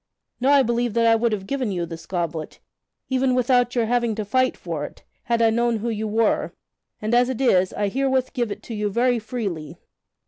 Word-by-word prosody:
Now 260 Hz, +3 st, +3 dB
I 280 Hz, -1 st, +6 dB
believe 235 Hz, -1 st, -1 dB
that 230 Hz, 0 st, +3 dB
I 230 Hz, -, +6 dB
would 230 Hz, +1 st, +2 dB
have 200 Hz, -3 st, -3 dB
given 255 Hz, -1 st, -2 dB
you 175 Hz, -2 st, -2 dB
this 165 Hz, 0 st, -9 dB
goblet, 170 Hz, -3 st, -4 dB, 0.5 s
even 260 Hz, -1 st, +2 dB
without 245 Hz, 0 st, +2 dB
your 235 Hz, -2 st, +2 dB
having 235 Hz, -1 st, +1 dB
to 215 Hz, -1 st, -3 dB
fight 255 Hz, +5 st, +1 dB
for 165 Hz, -4 st, -4 dB
it, -, -, -9 dB, 0.2 s
had 235 Hz, -2 st, +1 dB
I 225 Hz, -, +5 dB
known 235 Hz, 0 st, +1 dB
who 230 Hz, +2 st, -3 dB
you 220 Hz, -1 st, -2 dB
were; 220 Hz, +1 st, +1 dB, 0.5 s
and 215 Hz, +2 st, -2 dB
as 245 Hz, +1 st, +4 dB
it 260 Hz, -, -3 dB
is 190 Hz, -8 st, +3 dB
I 205 Hz, -, -1 dB
herewith 265 Hz, +3 st, 0 dB
give 240 Hz, -4 st, -1 dB
it -, -, -6 dB
to 235 Hz, -, -7 dB
you 210 Hz, -1 st, -1 dB
very 240 Hz, +3 st, +2 dB
freely." 200 Hz, -, -5 dB
230 Hz, 215 wpm, -23 LUFS, 205-245 Hz, 0.5 s, I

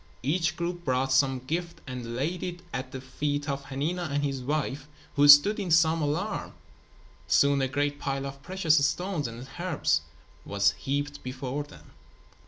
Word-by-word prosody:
Each 165 Hz, +5 st, +1 dB
group 175 Hz, 0 st, -3 dB
brought 130 Hz, -2 st, 0 dB
some 135 Hz, 0 st, +3 dB
gift 170 Hz, +3 st, -3 dB
and 125 Hz, -3 st, -6 dB
laid 160 Hz, +8 st, -2 dB
it 175 Hz, -1 st, -5 dB
at 130 Hz, 0 st, -4 dB
the 130 Hz, -, -5 dB
feet 145 Hz, +3 st, -3 dB
of 140 Hz, -1 st, -3 dB
Hanina 155 Hz, +6 st, -2 dB
and 145 Hz, +1 st, -1 dB
his 135 Hz, -2 st, -2 dB
wife 145 Hz, +1 st, -2 dB, 0.3 s
who 145 Hz, 0 st, +5 dB
stood 145 Hz, +10 st, +8 dB
in 195 Hz, -3 st, -3 dB
some 165 Hz, 0 st, +4 dB
alarm. 170 Hz, +8 st, -2 dB, 0.7 s
Soon 140 Hz, -1 st, +4 dB
a 135 Hz, -, +1 dB
great 145 Hz, +2 st, -1 dB
pile 135 Hz, -1 st, -2 dB
of 140 Hz, 0 st, -7 dB
precious 160 Hz, -3 st, +2 dB
stones 175 Hz, -2 st, 0 dB
and 115 Hz, +3 st, -8 dB
herbs 165 Hz, -, +1 dB, 0.4 s
was 100 Hz, 0 st, +2 dB
heaped 145 Hz, +5 st, -3 dB
before 130 Hz, +2 st, -4 dB
them. 145 Hz, -, -13 dB
145 Hz, 165 wpm, -28 LUFS, 135-165 Hz, 0.7 s, stood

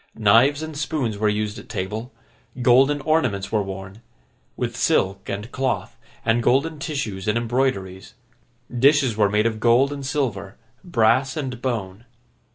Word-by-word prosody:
Knives 115 Hz, +8 st, +4 dB
and 155 Hz, -1 st, -6 dB
spoons 135 Hz, -8 st, -2 dB
were 105 Hz, 0 st, +2 dB
used 105 Hz, +1 st, -2 dB
at -, -, -14 dB
table; 110 Hz, +7 st, -4 dB, 0.5 s
golden 135 Hz, +4 st, +4 dB
ornaments 125 Hz, -11 st, 0 dB
were 110 Hz, -, +2 dB
worn—with 95 Hz, -, -8 dB
silk 95 Hz, +1 st, 0 dB
and 105 Hz, +4 st, -5 dB
cloth, 130 Hz, -3 st, -2 dB, 0.3 s
and 115 Hz, +1 st, +2 dB
golden 140 Hz, +6 st, +1 dB
tissues 115 Hz, -11 st, -4 dB
and 105 Hz, +2 st, +2 dB
embroideries; 110 Hz, -5 st, -2 dB, 0.6 s
dishes 135 Hz, -1 st, +4 dB
were 105 Hz, -1 st, +3 dB
made 105 Hz, +1 st, +1 dB
of 110 Hz, -1 st, -1 dB
gold 120 Hz, +5 st, +3 dB
and 140 Hz, -1 st, -7 dB
silver, 125 Hz, -9 st, -3 dB, 0.3 s
brass 130 Hz, -2 st, +2 dB
and 130 Hz, -5 st, -4 dB
bone. 110 Hz, -4 st, -4 dB
115 Hz, 140 wpm, -22 LUFS, 105-135 Hz, 0.6 s, Knives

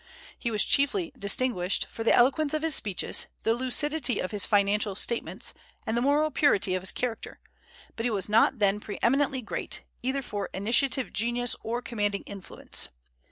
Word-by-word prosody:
He 235 Hz, -, -2 dB
was 215 Hz, -2 st, +1 dB
chiefly 305 Hz, +3 st, +1 dB
distinguished 200 Hz, -4 st, +1 dB
for 225 Hz, -, -7 dB
the 225 Hz, -, +3 dB
eloquence 280 Hz, +5 st, +3 dB
of 310 Hz, -, -2 dB
his 325 Hz, -1 st, +2 dB
speeches, 200 Hz, -8 st, 0 dB, 0.2 s
the 225 Hz, -, +2 dB
lucidity 260 Hz, +3 st, +1 dB
of 185 Hz, -, -3 dB
his 205 Hz, -3 st, 0 dB
financial 205 Hz, 0 st, +2 dB
statements, 235 Hz, +3 st, -1 dB, 0.3 s
and 220 Hz, -, -2 dB
the 235 Hz, -, +1 dB
moral 295 Hz, +4 st, +2 dB
purity 200 Hz, -12 st, +3 dB
of 185 Hz, -, -1 dB
his 190 Hz, -, +4 dB
character; 245 Hz, -2 st, -4 dB, 0.6 s
but 225 Hz, -, -4 dB
he 245 Hz, -, +1 dB
was 200 Hz, -5 st, -1 dB
not 215 Hz, +2 st, +3 dB
then 205 Hz, -1 st, +2 dB
pre 210 Hz, -1 st, -7 dB
eminently 270 Hz, +1 st, +2 dB
great, -, -, -4 dB, 0.2 s
either 265 Hz, +2 st, -2 dB
for 205 Hz, -4 st, -4 dB
initiative 245 Hz, +6 st, +1 dB
genius 240 Hz, +2 st, 0 dB
or 235 Hz, +2 st, -3 dB
commanding 205 Hz, -3 st, -2 dB
influence. 200 Hz, -3 st, -3 dB
235 Hz, 170 wpm, -27 LUFS, 205-270 Hz, 0.6 s, his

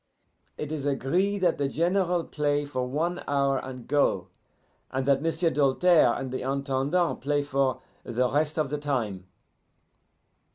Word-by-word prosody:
It 150 Hz, 0 st, -5 dB
is 155 Hz, -3 st, -3 dB
agree 175 Hz, +9 st, +1 dB
that 180 Hz, -5 st, +1 dB
the 140 Hz, -, +1 dB
General 175 Hz, +3 st, +1 dB
play 145 Hz, -1 st, -1 dB
for 130 Hz, -3 st, -3 dB
one 165 Hz, +7 st, -1 dB
hour 140 Hz, -1 st, +1 dB
and 130 Hz, -2 st, -8 dB
go, 145 Hz, 0 st, +1 dB, 0.6 s
and 130 Hz, 0 st, -2 dB
that 140 Hz, 0 st, +3 dB
M'sieu' 165 Hz, +1 st, +1 dB
Doltaire 150 Hz, -1 st, +4 dB
and 130 Hz, -1 st, -5 dB
the 130 Hz, -, -3 dB
Intendant 140 Hz, +5 st, 0 dB
play 145 Hz, +1 st, 0 dB
for 135 Hz, -2 st, 0 dB, 0.2 s
the 125 Hz, +1 st, 0 dB
rest 150 Hz, +4 st, 0 dB
of 150 Hz, -3 st, 0 dB
the 150 Hz, -, -2 dB
time. 110 Hz, -11 st, -2 dB
145 Hz, 150 wpm, -27 LUFS, 130-160 Hz, 0.6 s, Doltaire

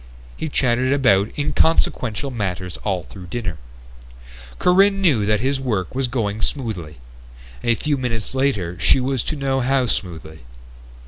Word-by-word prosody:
He 160 Hz, -, -4 dB
chattered 130 Hz, -1 st, +1 dB
about 110 Hz, -7 st, +3 dB
inconsequential 140 Hz, -4 st, +1 dB
matters 95 Hz, -6 st, -3 dB
all 95 Hz, -4 st, -2 dB
through 90 Hz, +2 st, -11 dB
dinner. 95 Hz, -6 st, -4 dB, 1.0 s
Corinne 195 Hz, +2 st, +4 dB
knew 135 Hz, -, +3 dB
that 105 Hz, -1 st, +2 dB
his 135 Hz, +2 st, 0 dB
work 105 Hz, -9 st, -2 dB
was 130 Hz, 0 st, 0 dB
going 110 Hz, -4 st, -2 dB
smoothly. 105 Hz, -, -3 dB, 0.7 s
A 120 Hz, -, +3 dB
few 145 Hz, +3 st, -1 dB
minutes 115 Hz, -3 st, -2 dB
later 105 Hz, -11 st, 0 dB
she -, -, +4 dB
was 130 Hz, -1 st, 0 dB
to 155 Hz, -, -2 dB
know 135 Hz, -2 st, 0 dB
how 130 Hz, 0 st, +2 dB
smoothly. 80 Hz, -7 st, -4 dB
120 Hz, 140 wpm, -21 LUFS, 100-135 Hz, 1.0 s, Corinne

